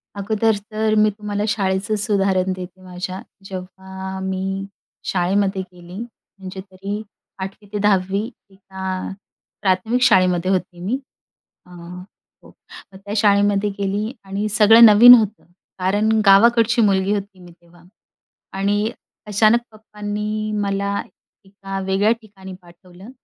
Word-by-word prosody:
अगोदर 215 +2 0 0.2
तर 215 0 0
मी 215 - +4
तुम्हाला 205 0 -4
शाळेचेच 205 +1 -1
उदाहरण 190 -2 +1
देते 185 0 -10
माझ्या. 185 +1 -6 0.2
जेव्हा 190 0 -8
मी, 190 +1 -3 0.4
शाळेमध्ये 190 +2 0
गेली, 180 -1 -13 0.4
म्हणजे 190 0 -9
तरी 200 +3 -5 0.4
8वी 195 +2 -9
ते 210 - -1
10वी 200 +2 +1 0.2
तिथं 190 0 -17 0.3
अ, - - -7 0.5
प्राथमिक 205 +5 +1
शाळेमध्ये 185 -2 +3
होते 180 -2 -2
मी, 245 +6 0 0.7
अ - - -21 0.7
हो - - -16 0.4
त्या 200 +2 -8
शाळेमध्ये 205 0 +3
गेली 200 +3 -2
आणि 200 +2 -3
सगळं 225 +2 +7
नवीन 225 +4 +10
होतं, 215 -3 +2 0.4
कारण 205 +4 +1 0.2
गावाकडची 230 +4 +5
मुलगी 195 -1 +2
होती 200 -1 -5
मी 175 -1 -14
तेव्हा. 170 0 -22 0.7
आणि 205 +3 0 0.4
अचानक 215 +3 +4
पप्पांनी 210 0 -5
मला 200 0 -1 0.4
एका 195 0 -7
वेगळ्या 195 +3 +2
ठिकाणी 195 -3 -12
पाठवलं 180 +4 -16
195 Hz, 120 wpm, -20 LUFS, 190-210 Hz, 0.7 s, नवीन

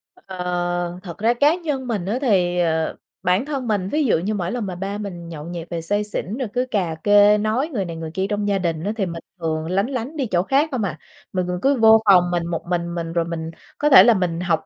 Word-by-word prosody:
Ờ, 175 -1 -3
thật 170 -4 -8
ra 230 +3 +2
cá 290 +6 +3
nhân 290 -7 -3
mình 205 -7 -2
á, 215 +6 -1
thì, 180 -8 +2
ờ, 160 -2 0 0.3
bản 185 +8 +2
thân 275 -5 -4
mình, 200 -3 0
ví 300 -1 +1
dụ 215 - +3
như 200 +6 -2
mỗi 180 -3 -2
lần 240 -4 -3
mà 185 - -5
ba 195 +3 -4
mình 175 -5 -7
nhậu 150 -3 -7
nhẹt 170 -1 -7
về 170 -1 -3
say 205 +5 0
xỉn, 210 +1 -4
rồi 260 - -2
cứ 250 +1 0
cà 180 -7 0
kê, 205 0 +6
nói 220 +8 0
người 195 -5 -1
này, 165 -1 -6
người 160 -1 -6
kia 190 +2 -1
trong 205 0 -1
gia 200 -1 +2
đình 165 -3 -2
á, 205 - -1
thì 195 - 0
mình 170 -1 -5 0.2
thường 160 -1 -2
lánh 195 +5 +1
lánh 265 +3 -4
đi 270 - 0
chỗ 180 -5 +1
khác 280 +7 +2
không 245 -5 -1
hà. 155 -6 -3 0.4
Mình 185 -1 -1
mình 180 0 -2
cứ 280 +1 +3
vô 220 0 +7
phòng 180 -3 +5
mình 170 -1 0
một 170 -1 -4
mình 170 -1 -2
mình, 165 -1 -4
rồi 170 -1 +1
mình 165 -1 -5 0.3
có 295 - +2
thể 270 - +10
là 235 - +6
mình 175 -4 -1
học 175 -3 0
190 Hz, 260 wpm, -21 LUFS, 170-220 Hz, 0.4 s, thể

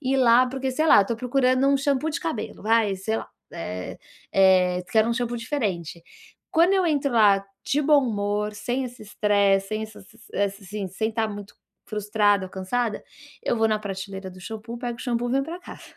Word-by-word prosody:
ir 270 -1 0
lá 250 -1 +5
porque, 265 0 -3
sei 310 +5 0
lá, 205 - +7
tô 230 - -3
procurando 255 +2 +2
um 275 0 +4
shampoo 280 +1 0
de 300 - -3
cabelo, 320 -13 -4
ai, 225 -3 +3
sei 195 +4 -2
lá, - - -5 0.3
eh 90 - -6 0.3
eh, 185 -2 +4
quero 220 0 +4
um 235 - +1
shampoo 240 0 -2
diferente. 205 - -3 0.5
Quando 340 +4 +4
eu 380 -2 +3
entro 285 -3 +1
lá, 205 -3 +5 0.2
de 295 +2 +1
bom 295 0 +5
humor, 210 -1 -1
sem 245 +5 -2
esse 245 -2 -9
estresse, 200 -2 +2
sem 215 0 -2
essas 220 -3 -10 0.3
ess 200 +1 -1
assim, 195 +1 -5
sem 220 +4 -2
estar 225 0 0
muito 205 -1 -8 0.3
frustrada 205 -2 +1
ou - - -14
cansada, 210 +4 -2 0.4
eu 240 - 0
vou 225 0 +3
na 215 -1 +1
prateleira 195 -1 -6
do 185 0 -13
shampoo, 225 +4 -7
pego 240 -1 -4
o - - -9
shampoo 245 -1 -1
e - - -2
venho 275 +1 +2
pra 330 +4 -6
casa. - - -11
220 Hz, 200 wpm, -24 LUFS, 200-255 Hz, 0.5 s, lá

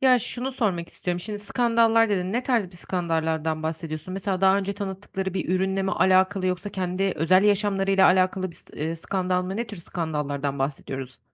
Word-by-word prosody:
Ya 255 -2 +5
şunu 255 +3 -2
sormak 190 -9 -1
istiyorum, 175 -1 -3
şimdi 210 +2 -4
skandallar 230 +1 +3
dedin, 185 -1 -1
ne 245 +2 0
tarz 240 -7 +1
bir 175 - -11
skandallardan 160 -3 -1
bahsediyorsun? 160 +2 -4
Mesela 195 -1 -2
daha 190 0 +5
önce 200 0 -2
tanıttıkları 190 -1 -5
bir - - -2
ürünle 190 +1 +1
mi 190 - -1
alakalı 185 0 +3
yoksa 185 +3 -2
kendi 185 +1 -1
özel 185 +5 +4
yaşamlarıyla 195 -2 +3
alakalı 185 0 +2
bir 170 - -13
s - - -13 0.2
ııı, 165 +1 -2
skandal 180 +1 -1
mı? 190 +2 -4
Ne 235 0 -2
tür 205 -2 -8
skandallardan 150 -5 -3
bahsediyoruz? 135 -1 -4
185 Hz, 180 wpm, -25 LUFS, 170-200 Hz, 0.2 s, Ya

